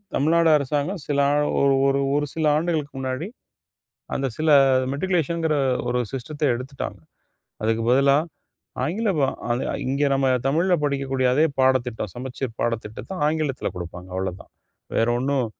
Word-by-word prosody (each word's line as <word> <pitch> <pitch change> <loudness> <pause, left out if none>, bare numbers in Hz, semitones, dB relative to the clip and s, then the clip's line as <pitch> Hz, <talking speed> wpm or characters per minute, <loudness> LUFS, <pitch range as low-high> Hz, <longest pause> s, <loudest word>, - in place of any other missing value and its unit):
தமிழ்நாடு 165 +3 +3
அரசாங்கம் 145 +6 -2
சில 140 -1 0
ஆ - - +2 0.3
ஒரு 140 -1 +4
ஒரு 140 0 +2
ஒரு 145 - +1
சில 160 -1 -1
ஆண்டுகளுக்கு 155 -3 -1
முன்னாடி 130 +6 -3 0.9
அந்த 135 - -1
சில 155 0 +2 0.4
மெட்ரிகுலேஷன்ங்கற 165 -1 0 0.3
ஒரு 125 0 +1
சிஸ்டத்த 145 +4 -4
எடுத்துட்டாங்க. 125 -6 -6 0.6
அதுக்கு 115 +1 +1
பதிலா 140 +2 +5 0.7
ஆங்கிலம் 195 -2 0 0.3
அது 120 +2 0 0.2
இங்கே 140 +2 +1
நம்ம 135 0 +1 0.2
தமிழ்ல 170 +6 +2
படிக்கக்கூடிய 135 -2 0
அதே 155 +3 +4 0.2
பாடத்திட்டம். 125 -5 +1
சமச்சீர் 125 -1 -5
பாடத்திட்டத்த 115 - -3 0.2
ஆங்கிலத்தில 155 -4 -1
கொடுப்பாங்க. 90 +1 -7
அவ்ளதான். 95 -1 -4 0.5
வேற 115 - +3
ஒண்ணும் 135 -1 0
140 Hz, 125 wpm, -23 LUFS, 125-155 Hz, 0.9 s, பதிலா